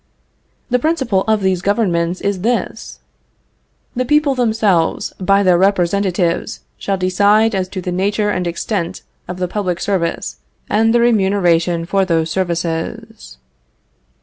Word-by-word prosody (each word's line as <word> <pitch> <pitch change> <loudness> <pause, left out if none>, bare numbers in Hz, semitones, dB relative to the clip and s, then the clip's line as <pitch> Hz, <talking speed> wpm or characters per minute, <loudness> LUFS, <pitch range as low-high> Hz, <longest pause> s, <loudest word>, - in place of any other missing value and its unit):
The 250 - +3
principle 265 - 0
of 220 -1 +2
these 185 -2 +1
governments 185 -4 0
is 200 -2 -2
this: 235 +4 -3 0.9
"The 255 - 0
people 295 +1 +2
themselves, 220 -9 +1
by 195 +1 +3
their 180 -2 +4
representatives, 185 -2 0 0.2
shall 195 -1 -1
decide 205 +4 +3
as 190 -2 -1
to 190 -1 -5
the 180 - -4
nature 205 +3 0
and 180 -3 -2
extent 170 +1 -3 0.2
of 180 - -6
the 180 0 -2
public 185 -2 -2
service 185 -5 -2 0.3
and 225 +1 +2
the 240 0 +3
remuneration 185 -7 +2
for 195 +2 +1
those 165 -3 0
services." 165 - -4
190 Hz, 130 wpm, -17 LUFS, 175-210 Hz, 0.9 s, their